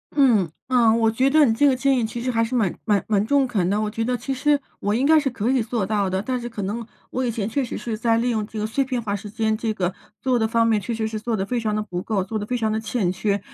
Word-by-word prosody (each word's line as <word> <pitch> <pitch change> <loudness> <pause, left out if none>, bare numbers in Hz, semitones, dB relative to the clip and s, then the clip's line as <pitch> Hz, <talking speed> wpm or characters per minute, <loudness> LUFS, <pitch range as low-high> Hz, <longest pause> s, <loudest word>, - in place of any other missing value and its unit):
嗯， 230 - +4 0.2
呃， 240 -3 +5
我 225 -1 +3
觉 255 +4 +2
得 305 +1 +5
你 230 - +3
这 285 +6 +4
个 270 - +4
建 270 +1 +2
议 - - 0
其 225 +2 -4
实 255 +2 -1
还 230 -1 +2
是 245 +3 -2
蛮 205 -7 +1
蛮 205 -3 +1
蛮 205 -2 +2
中 280 0 +3
肯 195 -8 0
的， 205 +2 +1
我 215 -1 -1
觉 225 +1 -2
得 250 +2 0
其 270 +3 -3
实 290 +2 +2 0.2
我 205 +1 0
应 260 +4 +1
该 315 +1 +6
是 285 -2 0
可 235 -1 -1
以 265 -2 +2
做 225 -2 -1
到 200 -1 0
的， 190 0 -1
但 250 +5 -2
是 240 - -5
可 220 -3 -5
能 215 +5 -3 0.3
我 255 - -1
以 245 - 0
前 220 -3 -2
确 270 +5 -1
实 240 - -5
是 230 -2 -4
在 225 +1 +1
利 240 +1 +1
用 215 -2 -1
这 225 - -9
个 210 - -1
碎 225 +6 0
片 255 -2 -2
化 205 -3 -2
时 205 +1 -7
间， 220 0 0
这 225 0 -2
个 180 -2 -1 0.3
做 255 -2 +1
的 220 - +2
方 230 +1 +2
面 220 -2 +2
确 235 - -3
实 220 -1 -1
是 220 0 -4
做 220 0 -2
的 190 - -1
非 245 +4 -1
常 215 -2 -1
的 215 - -1
不 180 -4 -5
够， 200 -1 -1
做 215 +3 -3
的 205 - -4
非 250 - -1
常 220 -2 0
的 220 - 0
欠 220 -5 -1
缺， 200 +2 0
225 Hz, 340 characters per minute, -23 LUFS, 210-250 Hz, 0.3 s, 该